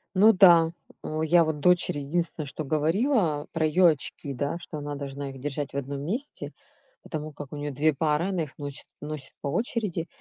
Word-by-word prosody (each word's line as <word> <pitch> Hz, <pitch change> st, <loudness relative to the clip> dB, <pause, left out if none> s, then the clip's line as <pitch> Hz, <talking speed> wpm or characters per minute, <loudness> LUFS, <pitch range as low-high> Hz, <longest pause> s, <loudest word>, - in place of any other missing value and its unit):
Ну 215 Hz, +4 st, +7 dB
да, 170 Hz, -4 st, +7 dB, 0.3 s
у 155 Hz, 0 st, -3 dB
я 165 Hz, +2 st, +5 dB
вот 155 Hz, -2 st, -2 dB
дочери 175 Hz, -3 st, +3 dB
единственное, 160 Hz, +2 st, -2 dB
что 155 Hz, -, -5 dB
говорила- 160 Hz, -, +1 dB
про 160 Hz, -1 st, 0 dB
ее 175 Hz, +3 st, +5 dB
очки, 145 Hz, -1 st, -3 dB
да. 140 Hz, +5 st, -2 dB
Что 165 Hz, -2 st, -8 dB
она 145 Hz, 0 st, -4 dB
должна 140 Hz, 0 st, -5 dB
их 135 Hz, -1 st, -9 dB
держать 145 Hz, +1 st, -4 dB
в -, -, -3 dB
1 140 Hz, 0 st, -4 dB
месте, 230 Hz, -, -4 dB, 0.5 s
потому 155 Hz, -2 st, -5 dB
как 145 Hz, -1 st, -9 dB
у -, -, -5 dB
нее 145 Hz, 0 st, -3 dB
2 150 Hz, +3 st, +2 dB
пары, 155 Hz, +4 st, +1 dB
она 185 Hz, -4 st, 0 dB
их 150 Hz, -, -10 dB
ночит 145 Hz, -1 st, -7 dB, 0.2 s
носит 150 Hz, -2 st, -6 dB
по -, -, -3 dB
очереди. 210 Hz, -, -1 dB
155 Hz, 195 wpm, -27 LUFS, 145-170 Hz, 0.5 s, Ну